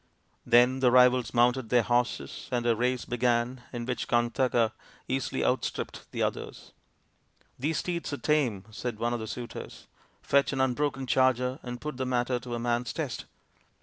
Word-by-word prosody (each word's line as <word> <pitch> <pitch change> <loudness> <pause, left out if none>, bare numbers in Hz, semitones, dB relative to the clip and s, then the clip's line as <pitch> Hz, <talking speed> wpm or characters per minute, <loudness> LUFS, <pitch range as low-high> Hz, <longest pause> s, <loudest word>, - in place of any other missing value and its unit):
Then 120 +2 +5
the 130 -1 +4
rivals 125 -1 +5
mounted 120 0 +2
their 120 0 +4
horses 120 +3 -1
and 120 -1 0
a 120 -1 +3
race 125 +2 0
began, 120 +1 0
in 120 -1 -4
which 125 0 -3
Kantaka 120 -1 +2 0.4
easily 130 0 -1
outstripped - - -2
the - - -1
others. - - -4 0.4
" - - -38
These 150 +5 0
steeds 170 -3 -3
are 145 - -2
tame," 130 -12 +1
said 115 +1 -4
one 120 +2 -1
of 120 - -2
the 110 - -5
suitors; 120 +3 -7 0.2
" - - -37
fetch 140 0 +2
an 135 - -2
unbroken 135 +1 0
charger 130 +1 +2
and 125 -1 -6
put 150 -3 -5
the 130 -1 -2
matter 125 0 0
to 120 0 -5
a - - -3
man's 120 0 -1
test." 145 -8 -4
125 Hz, 175 wpm, -28 LUFS, 120-130 Hz, 0.4 s, Then